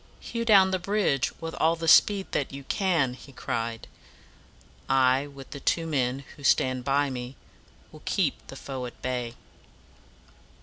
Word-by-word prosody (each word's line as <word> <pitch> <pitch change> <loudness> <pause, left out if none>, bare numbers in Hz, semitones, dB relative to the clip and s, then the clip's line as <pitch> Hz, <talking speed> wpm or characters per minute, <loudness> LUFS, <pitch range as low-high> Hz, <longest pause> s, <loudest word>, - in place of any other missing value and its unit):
"Hew 230 0 -4
down 195 -4 +6
the 185 - 0
bridge 185 -9 +1
with 165 0 -5
all 165 +1 +3
the 165 0 -5
speed 195 +4 +6
that 140 - -1
you 140 0 -8
can!" 160 -6 +1
he 135 +2 -13
cried. 115 -3 -4 1.0
"I, 135 +1 +3
with 140 -2 -12
the 140 - -6
two 165 +4 0
men 135 -3 -1
who 140 - -14
stand 130 -1 +2
by 140 +1 +1
me, 125 +1 -6 0.6
will - - -14
keep - - -1
the - - -9
foe 130 -2 -5
at 120 - -13
bay." 125 -2 -3
140 Hz, 160 wpm, -27 LUFS, 130-165 Hz, 1.0 s, down